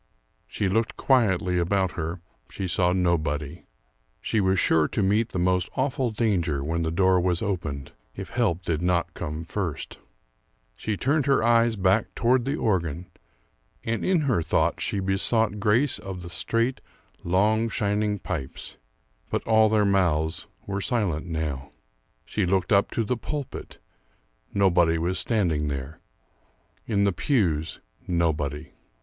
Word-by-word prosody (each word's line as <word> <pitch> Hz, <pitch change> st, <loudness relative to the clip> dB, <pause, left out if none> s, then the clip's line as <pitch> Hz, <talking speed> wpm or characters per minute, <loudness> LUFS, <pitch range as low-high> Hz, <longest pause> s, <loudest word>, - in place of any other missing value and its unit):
She 100 Hz, -, -1 dB
looked 110 Hz, +4 st, 0 dB
quietly 95 Hz, -9 st, +2 dB
about 95 Hz, +1 st, +1 dB
her; 85 Hz, +1 st, -4 dB, 0.3 s
she 95 Hz, -, -4 dB
saw 90 Hz, 0 st, +2 dB
nobody. 80 Hz, -5 st, -1 dB, 0.5 s
She 110 Hz, -, 0 dB
was 95 Hz, -1 st, +2 dB
sure 80 Hz, -1 st, +3 dB
to 105 Hz, -, -1 dB
meet 105 Hz, +4 st, +2 dB
the -, -, -5 dB
most 90 Hz, 0 st, +1 dB
awful 130 Hz, -1 st, 0 dB
danger 90 Hz, -11 st, 0 dB
when 80 Hz, +3 st, -1 dB
the 80 Hz, -, 0 dB
door 95 Hz, +2 st, +3 dB
was 90 Hz, +2 st, 0 dB
opened, 80 Hz, -9 st, -3 dB, 0.2 s
if -, -, -7 dB
help 85 Hz, +1 st, 0 dB
did 80 Hz, -2 st, -1 dB
not 90 Hz, -1 st, 0 dB
come 75 Hz, +2 st, -5 dB
first. 85 Hz, -4 st, -4 dB, 0.8 s
She 105 Hz, -2 st, -3 dB
turned 145 Hz, +5 st, +1 dB
her 135 Hz, -5 st, +3 dB
eyes 115 Hz, 0 st, +4 dB
back 95 Hz, +2 st, +1 dB
toward 125 Hz, +1 st, +2 dB
the 135 Hz, +2 st, 0 dB
organ, 90 Hz, -, -1 dB, 0.7 s
and 115 Hz, -1 st, -2 dB
in 185 Hz, -3 st, +2 dB
her 130 Hz, -, +1 dB
thoughts -, -, 0 dB
she 100 Hz, -, -1 dB
besought 105 Hz, +3 st, +1 dB
grace 115 Hz, +7 st, +2 dB
of 95 Hz, -2 st, -7 dB
the 85 Hz, -, -8 dB
straight, 115 Hz, +8 st, 0 dB, 0.4 s
long, 105 Hz, +6 st, +2 dB
shining 105 Hz, 0 st, 0 dB
pipes. 80 Hz, -9 st, -6 dB, 0.5 s
But -, -, -1 dB
all 110 Hz, -1 st, +5 dB
their 105 Hz, -1 st, +3 dB
mouths 80 Hz, -4 st, +1 dB, 0.2 s
were 100 Hz, 0 st, -3 dB
silent 95 Hz, -6 st, -1 dB
now. 75 Hz, -4 st, -4 dB, 0.5 s
She 100 Hz, -4 st, -1 dB
looked 95 Hz, +2 st, +1 dB
up 100 Hz, 0 st, +4 dB
to 115 Hz, -, -1 dB
the 125 Hz, +3 st, -1 dB
pulpit; 140 Hz, +4 st, -6 dB, 0.7 s
nobody 90 Hz, -4 st, +3 dB
was 85 Hz, +3 st, -1 dB
standing 85 Hz, -10 st, 0 dB
there. 70 Hz, +2 st, -5 dB, 0.9 s
In 100 Hz, -3 st, +1 dB
the 100 Hz, -, +3 dB
pews 85 Hz, -, 0 dB, 0.3 s
nobody. 80 Hz, -3 st, -1 dB
95 Hz, 145 wpm, -25 LUFS, 85-110 Hz, 0.9 s, all